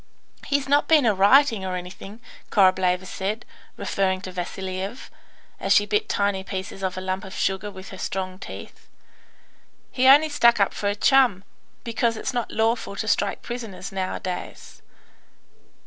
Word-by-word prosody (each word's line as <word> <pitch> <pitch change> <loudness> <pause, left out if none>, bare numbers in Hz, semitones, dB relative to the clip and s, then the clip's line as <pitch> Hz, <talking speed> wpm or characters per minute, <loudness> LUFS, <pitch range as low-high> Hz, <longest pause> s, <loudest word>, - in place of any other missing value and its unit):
"He's 285 -1 0
not 285 +1 +3
been 310 -5 +5
a 220 - +4
rioting, 220 +3 +4
or 185 -1 -3
anything," 190 +4 -9 0.3
Korableva 185 -2 +3
said, 200 +4 -4 0.3
referring 190 -1 0
to 185 - -7
Vasiliev, 185 +4 -5 0.5
as - - +2
she - - +4
bit 425 0 0
tiny 200 -1 0
pieces 195 +1 -6
off 185 -1 -2
a - - -3
lump 185 0 -3
of 190 - -9
sugar 195 +2 -1
with 190 -1 -11
her 190 - -10
strong 185 -1 -4
teeth. - - -10 1.0
"He 260 0 +2
only 295 +4 +7
stuck 235 -6 +4
up 200 - +2
for 205 - -1
a 205 - -1
chum, 240 -4 +4 0.4
because 230 -1 0
it's 255 - -3
not 240 -2 -2
lawful 225 -2 0
to 220 - -4
strike 205 -1 0
prisoners 225 -6 -6
nowadays." 185 -1 -5
200 Hz, 155 wpm, -24 LUFS, 190-235 Hz, 1.0 s, only